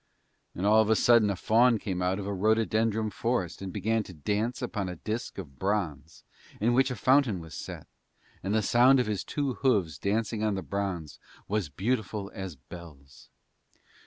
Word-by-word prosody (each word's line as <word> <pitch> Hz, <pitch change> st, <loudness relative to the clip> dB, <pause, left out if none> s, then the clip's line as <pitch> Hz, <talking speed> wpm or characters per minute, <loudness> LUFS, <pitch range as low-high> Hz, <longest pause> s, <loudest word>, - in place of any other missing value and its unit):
And 90 Hz, -, -3 dB
all 110 Hz, +1 st, +6 dB
of 110 Hz, -, 0 dB
a 110 Hz, -, +5 dB
sudden 115 Hz, -2 st, +5 dB
a 100 Hz, -, 0 dB
faun 115 Hz, +5 st, +4 dB
came 95 Hz, -3 st, -4 dB
out 90 Hz, +1 st, +1 dB
of 100 Hz, -, -5 dB
a 100 Hz, -, -2 dB
rhododendron 110 Hz, +1 st, +1 dB
forest 115 Hz, -9 st, -2 dB
and 95 Hz, -1 st, -5 dB
began 110 Hz, +4 st, 0 dB
to 95 Hz, -4 st, -10 dB
dance 105 Hz, -, -1 dB
upon 105 Hz, -7 st, -3 dB
a 90 Hz, -, -5 dB
disk 110 Hz, +7 st, -5 dB
of 70 Hz, -9 st, -9 dB
bronze 90 Hz, -7 st, -2 dB, 0.4 s
in 115 Hz, +3 st, +2 dB
which 130 Hz, +2 st, +3 dB
a 125 Hz, -, -3 dB
fountain 130 Hz, -3 st, +3 dB
was 80 Hz, -2 st, -10 dB
set; -, -, -7 dB, 0.6 s
and 100 Hz, +3 st, -1 dB
the 110 Hz, -, +2 dB
sound 125 Hz, +5 st, +5 dB
of 125 Hz, -, +2 dB
his 105 Hz, -3 st, -2 dB
two 140 Hz, -3 st, -2 dB
hooves 95 Hz, -, +1 dB
dancing 105 Hz, +3 st, -1 dB
on 105 Hz, -2 st, +1 dB
the 95 Hz, -, -4 dB
bronze 95 Hz, -7 st, -4 dB, 0.3 s
was 105 Hz, -6 st, -1 dB
beautiful 105 Hz, -, -2 dB
as 95 Hz, -4 st, -6 dB
bells. 70 Hz, 0 st, -13 dB
105 Hz, 185 wpm, -28 LUFS, 90-115 Hz, 0.6 s, all